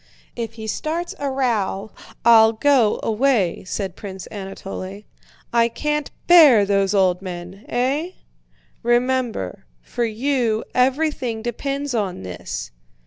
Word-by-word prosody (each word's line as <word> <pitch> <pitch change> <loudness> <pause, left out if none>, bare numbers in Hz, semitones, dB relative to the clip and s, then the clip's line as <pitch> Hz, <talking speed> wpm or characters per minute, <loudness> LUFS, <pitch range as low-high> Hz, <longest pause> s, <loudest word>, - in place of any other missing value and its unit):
"If 230 -2 -4
he 220 -1 -8
starts 320 +10 -3
a 280 -1 -1
row 220 -6 -1 0.3
I'll 225 -1 +7
go 245 -2 +3
away," 225 -5 +1
said 190 -1 -4
Prince 190 -2 -8
Anatole. 195 0 -7 0.5
"I 235 -1 +4
can't 300 +4 -2 0.2
bear 295 -12 +7
those 195 0 +1
old 185 -2 +3
men! 185 +2 -8
Eh?" 280 +9 0 0.7
"Remember, 240 - 0 0.2
for 240 - -3
you 230 -1 0
everything 255 -3 0
depends 275 +4 -3
on 195 - -2
this." 90 -1 -6
230 Hz, 115 wpm, -21 LUFS, 195-265 Hz, 0.7 s, I'll